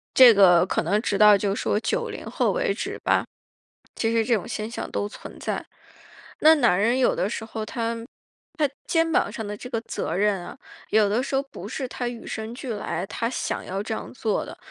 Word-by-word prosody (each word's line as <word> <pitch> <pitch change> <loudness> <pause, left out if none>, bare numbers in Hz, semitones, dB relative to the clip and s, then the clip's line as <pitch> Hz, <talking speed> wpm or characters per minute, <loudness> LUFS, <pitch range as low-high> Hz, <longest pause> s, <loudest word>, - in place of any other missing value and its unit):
这 250 -3 +10
个 180 -4 +6
可 - - 0
能 195 +6 +1
直 205 - 0
到 210 -1 +7
就 200 0 0
说 205 - 0
90 215 - -2
后 - - 0
为 - - 0
止 - - -4
吧， - - +2 0.7
其 225 0 0
实 230 0 +3
这 235 - +2
种 210 - -2
现 215 +1 -4
象 235 - -5
都 205 - -2
存 - - -11
在。 - - -3 0.8
那 315 +1 +8
男 240 -11 +3
人 235 +5 +2
有 255 - +3
的 195 - 0
时 230 - -4
候 220 -1 -5
他 230 0 -2 0.6
他 300 -2 +3 0.2
肩 330 -1 +2
膀 205 - +2
上 225 -1 -5
的 205 0 -5
这 250 +4 -9
个 230 -3 -1
责 - - -4
任 205 0 +2
啊， - - -8 0.4
有 215 -1 +4
的 220 +5 +1
时 275 - -4
候 270 - +2
不 270 -8 -10
是 255 +3 -4
他 245 - -4
与 240 -1 -8
生 220 +1 -5
俱 245 -1 -5
来， 195 -2 -3
他 230 +3 -2
想 - - -3
要 195 +2 -3
这 220 +1 -3
样 - - -7
做 225 -4 -1
的， - - -10
225 Hz, 235 characters per minute, -25 LUFS, 205-245 Hz, 0.8 s, 这